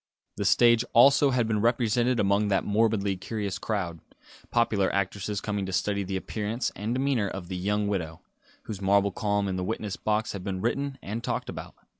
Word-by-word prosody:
The - - -2
stage, 120 -1 +5
also, 140 +4 +6
had 125 -3 +1
been 105 -2 0
represented 120 +1 +2
among 100 +1 +2
that 100 -1 +1
morbidly 105 -2 +1
curious 100 0 -4
crowd; 90 -7 -3 0.5
popular 105 -5 +2
actresses 100 +1 -2
coming 105 -2 -2
to - - -4
study 100 +2 0
the 95 0 -3
appearance 110 +5 -3
and 110 +4 -2
demeanour 130 -5 +1
of 95 -2 -7
the 95 - -3
young 105 +3 0
widow, 80 -5 -3 0.4
whose 105 -3 -7
marble 100 +1 +3
calm 100 0 0
in 95 -1 -2
the 90 - -2
witness 105 0 -3
box 110 +1 0
had 100 -2 -6
been 95 -1 -3
written 135 +5 -1
and 110 +4 -4
talked - - -2
about. - - -8
105 Hz, 185 wpm, -27 LUFS, 100-115 Hz, 0.5 s, also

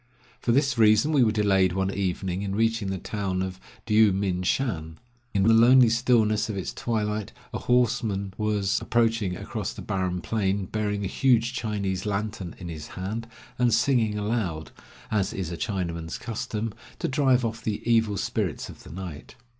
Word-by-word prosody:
For 120 - 0
this 135 -1 +2
reason 110 +6 +5
we 145 -4 +4
were 110 - +3
delayed 95 -4 +3
one 95 +1 0
evening 95 -1 -2
in 100 -1 -3
reaching 115 -1 +1
the 95 - -2
town 95 -1 -2
of 95 0 -5 0.3
Dyou 110 -1 +5
min 95 -2 -1
shan. 90 -7 -1 0.3
In 100 -4 +1
the 115 +3 +5
lonely 120 +2 +7
stillness 115 -3 +2
of 105 - -3
its 95 - -4
twilight 105 -2 -2 0.2
a - - -2
horseman 110 -5 +1
was 105 -2 0
approaching 115 -6 +1
across - - -4
the - - -8
barren 90 -1 -1
plain, 100 0 -1
bearing 105 0 -2
a - - 0
huge 120 +1 +2
Chinese 100 -5 -2
lantern 105 -3 -3
in 90 - -8
his 80 -3 -7
hand, 110 +5 -4 0.3
and 120 -1 +3
singing 115 -2 +2
aloud, 105 -7 -2 0.4
as 100 -3 0
is 90 -3 -4
a - - -3
Chinaman's 85 -5 -3
custom, 110 -1 -4 0.2
to - - -2
drive 130 -2 +3
off 115 0 -4
the 110 +1 -3
evil 115 -3 +3
spirits - - -2
of - - -11
the - - -13
night. 85 -4 -8
105 Hz, 170 wpm, -26 LUFS, 95-115 Hz, 0.4 s, lonely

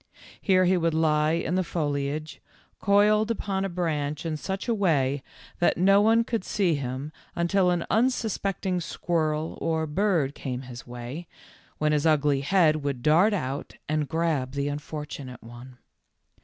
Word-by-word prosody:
Here 185 -2 +4
he 185 +1 +3
would 165 -2 +1
lie 155 -1 +2
in 165 0 -1
the 185 0 +2
foliage, 145 -2 -3 0.4
coiled 210 +2 +4
upon 195 -3 -1
a 195 - -1
branch 155 -4 -2
in 160 -1 -1
such 190 - -4
a 235 - +2
way 145 -9 +1 0.4
that 175 - +3
no 195 +3 +5
one 225 +2 +4
could 230 -3 -2
see 190 -5 +1
him 135 +1 -4 0.2
until 180 +2 +2
an 175 -1 0
unsuspecting 200 -6 0
squirrel 160 -2 -2
or 160 -1 0
bird 160 -3 +1
came 130 -3 -5
his 125 -2 -10
way, 125 +7 -7 0.5
when 150 0 +1
his 150 +1 +2
ugly 145 -3 +3
head 165 +1 +4
w 150 -2 -4
r - - +3
ould 125 -3 -5
dart 175 +9 +5
out 135 -5 -4
and 155 -1 -1
grab 160 -6 0
the 140 0 -1
unfortunate 145 -3 -6
one. 120 +2 -12
160 Hz, 160 wpm, -26 LUFS, 145-185 Hz, 0.5 s, no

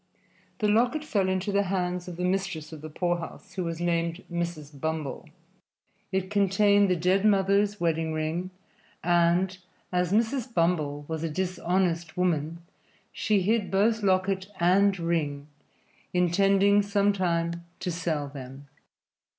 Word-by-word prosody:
The 215 - +1
locket 240 +8 +2
fell 200 -10 0
into 190 +2 -1
the 200 0 +3
hands 180 -1 -1
of 175 -2 -7
the 180 - -3
mistress 180 -4 -2
of 155 - -9
the 155 - -7
poorhouse, 175 +4 -3
who 185 - -2
was 165 -1 -4
named 170 0 -1
Mrs. 155 -5 -4
Bumble. 160 -1 -3 0.8
It 190 0 -2
contained 200 0 +4
the 180 - +3
dead 180 +3 +2
mother's 200 0 +3
wedding 165 -1 0
ring, 160 +3 -2 0.5
and, 175 +2 +3 0.4
as 180 -1 0
Mrs. 235 +4 +1
Bumble 155 -6 0
was 160 -1 -3
a 165 - -2
dishonest 175 -1 -1
woman, 170 -2 -1 0.5
she 205 -3 +1
hid 215 0 +1
both 220 +3 +2
locket 190 -1 +1
and 190 +3 +4
ring, 155 -4 -1 0.7
intending 195 +3 +4
sometime 185 -5 0 0.2
to 180 - -2
sell 165 -4 -2
them. 135 0 -10
180 Hz, 135 wpm, -27 LUFS, 165-195 Hz, 0.8 s, contained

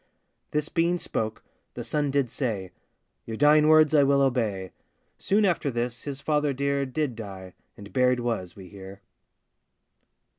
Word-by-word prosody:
This 150 0 -1
being 170 +2 +1
spoke, 110 -9 -4 0.3
the - - -5
son 150 -1 -1
did 135 -3 0
say, 105 -9 -3 0.6
'Your 110 -1 -5
dying 150 +1 +5
words 155 -1 +5
I 150 - +6
will 140 0 +3
obey.' 110 -8 -1 0.5
Soon 205 +2 +2
after 170 -6 +1
this 120 -1 -3
his 140 -1 -5
father 150 -2 +1
dear 140 0 -1
Did 135 -2 -2
die, 95 -4 -9 0.2
and 100 0 -12
buried 125 -1 +2
was, 115 -7 -3
we 95 -2 -11
hear. 95 0 -11
130 Hz, 150 wpm, -26 LUFS, 110-150 Hz, 0.6 s, I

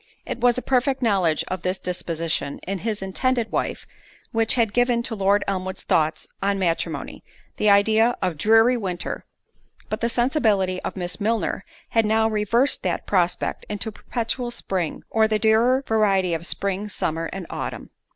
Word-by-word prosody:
It - - -4
was 245 0 +3
a 255 - -2
perfect 265 +1 +1
knowledge 185 -8 +2
of 185 -1 -4
this 185 +1 -1
disposition 165 -5 -2
in 195 +1 -3
his 210 0 -3
intended 235 +4 0
wife - - -2 0.5
which 225 -1 +2
had 225 -4 +1
given 245 -1 +2
to 235 - -3
Lord 200 0 +2
Elmwood's 190 -1 -3
thoughts 155 0 +1
on 200 0 +1
matrimony, 175 -3 -2 0.3
the 210 - +3
idea 220 +4 +4
of 180 -3 -1
dreary 225 +8 +4
winter; 185 -5 -4 0.6
but 215 - -3
the 235 - +1
sensibility 220 -8 +1
of - - -5
Miss 180 +1 -3
Milner 210 -3 0 0.3
had 225 -2 +2
now 220 +1 +3
reversed 225 +5 +2
that 180 -2 -2
prospect 180 -3 0
into 210 +1 -2
perpetual 240 +3 -3
spring; 190 -8 -3
or 220 -1 +4
the 215 0 +1
dearer 225 +5 +3
variety 195 -5 +2
of 165 +2 -3
spring, 200 +1 -2
summer, 165 -4 -2
and 190 -2 -6
autumn. - - -5
210 Hz, 160 wpm, -23 LUFS, 185-230 Hz, 0.6 s, idea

